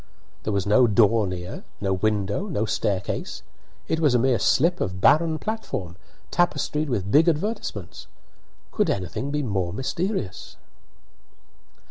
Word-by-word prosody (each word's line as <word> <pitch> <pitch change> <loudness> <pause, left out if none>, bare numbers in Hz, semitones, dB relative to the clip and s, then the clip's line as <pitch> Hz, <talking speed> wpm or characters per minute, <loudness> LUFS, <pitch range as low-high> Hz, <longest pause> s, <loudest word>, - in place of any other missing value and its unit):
There 110 - -3
was 100 -2 0
no 120 +5 +5
door 110 0 +4
near, 90 -1 -6 0.2
no 95 -1 0
window, 105 - 0
no 110 - -1
staircase; 100 -2 -2 0.4
it 160 - 0
was 150 -6 +3
a - - +6
mere 125 -1 +2
slip 170 - +2
of 95 0 -2
barren 160 - +4
platform, 155 - -4 0.4
tapestried 150 -3 0
with 100 -5 -2
big 155 +7 +5
advertisements. 155 - -3 0.6
Could - - +1
anything 95 - -2
be 150 0 -1
more 95 -7 -1
mysterious? 135 - -3
115 Hz, 130 wpm, -24 LUFS, 100-155 Hz, 0.6 s, a